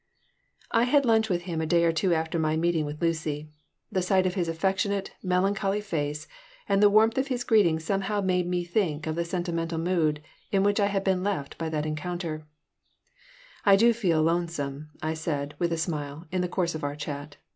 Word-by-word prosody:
I 230 0 +4
had 280 +2 +3
lunch 220 -1 +3
with 175 -2 0
him 170 -3 -3
a 160 - -2
day 170 +1 +3
or 165 - +4
two 165 +3 +1
after 160 0 0
my 155 0 +1
meeting 165 -1 +1
with 150 +1 -6
Lucy. 155 -2 -1 0.4
The 190 -3 +1
sight 185 +1 +2
of 185 - +1
his 180 -3 -1
affectionate, 195 +4 -1
melancholy 195 +2 +1
face 150 -6 -3 0.4
and 195 0 +2
the 205 - +7
warmth 220 +4 +4
of 265 - 0
his 250 -2 -2
greeting 195 -9 +4
somehow 195 +5 -1
made 180 -2 +1
me 180 0 0
think 175 -4 -1
of 160 - -1
the 170 - 0
sentimental 170 -1 -2
mood 160 -3 0 0.3
in 195 -1 +3
which 205 +1 +2
I 200 - +3
had 195 -1 -1
been 190 -2 +1
left 185 -8 -2
by 165 -1 -2
that 155 -1 -2
encounter 155 0 -4 1.2
"I 200 -1 +7
do 235 +4 +5
feel 175 -9 +1
lonesome," 155 -4 -1
I 155 0 0
said, 150 -3 -3
with 170 -1 0
a 165 - 0
smile, 155 -1 -4
in 185 0 0
the 180 - -1
course 175 -2 0
of 155 - -6
our 145 0 -2
chat. 145 0 -6
170 Hz, 200 wpm, -27 LUFS, 155-195 Hz, 1.2 s, the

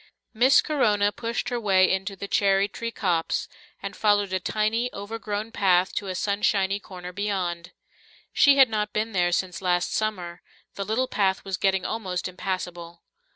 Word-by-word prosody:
Miss 250 +4 +5
Corona 210 -9 +2
pushed 230 +3 -3
her 245 -1 -2
way 190 -4 +4
into 190 +1 -3
the 200 - -6
cherry 195 0 +2
tree 230 +3 -5
copse, 175 -7 -1 0.4
and 200 0 -5
followed 205 -2 +2
a 185 - +1
tiny, 220 +5 -1
overgrown 210 +1 -5
path 185 -3 +2
to 200 - -3
a 185 - -3
sunshiny 200 0 +1
corner 180 -2 -9
beyond. 180 -4 -3 0.6
She 280 -1 +5
had 270 -1 +8
not 210 -2 -2
been 220 +1 -1
there 175 -3 +1
since 180 0 -2
last 175 -1 0
summer; 180 -5 -3 0.3
the 200 - -4
little 230 +6 0
path 195 -4 0
was 195 -1 -2
getting 190 -1 +1
almost 190 -6 -3
impassable. 180 -2 -5
200 Hz, 160 wpm, -25 LUFS, 185-215 Hz, 0.6 s, had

